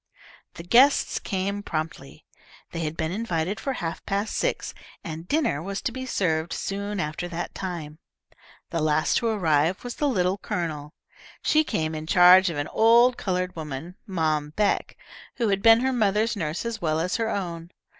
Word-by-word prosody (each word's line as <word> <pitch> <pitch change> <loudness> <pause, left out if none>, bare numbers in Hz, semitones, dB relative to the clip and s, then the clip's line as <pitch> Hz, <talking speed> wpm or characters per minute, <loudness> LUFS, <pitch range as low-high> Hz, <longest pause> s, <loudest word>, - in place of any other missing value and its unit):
The 170 - -8
guests 255 +10 +4
came 200 +1 -2
promptly. 155 -5 -5 0.5
They 165 - -5
had 155 -1 -3
been 160 0 -1
invited 195 -2 -2
for 270 - -2
half 165 -8 -5
past 200 +2 -1
six, - - -1 0.3
and 165 +1 -7
dinner 285 - +1
was 195 +3 -4
to - - -1
be 260 +1 -6
served 165 -7 0
soon 200 +1 -3
after 155 +1 -3
that 175 0 -5
time. 170 -5 -6 0.7
The 165 - -1
last 155 0 +2
to 235 - 0
arrive 170 -5 +1
was 245 -1 -6
the 295 - +1
Little 190 -4 +1
Colonel. 155 -3 -4 0.5
She 310 0 +4
came 160 - -2
in 155 0 -6
charge 180 +1 +7
of 165 - -4
an 145 +1 -2
old 235 +3 +5
coloured 180 -3 -2
woman, 155 +1 -6
Mom 155 -5 -1
Beck, 210 -1 0 0.4
who 230 -3 0
had 195 -1 +1
been 225 +1 +7
her 265 +1 +1
mother's 220 0 +1
nurse 160 +1 -3
as 230 -2 -4
well 155 -1 0
as 180 +3 -1
her 225 -1 -1
own. 170 -5 -4
180 Hz, 175 wpm, -25 LUFS, 160-215 Hz, 0.7 s, charge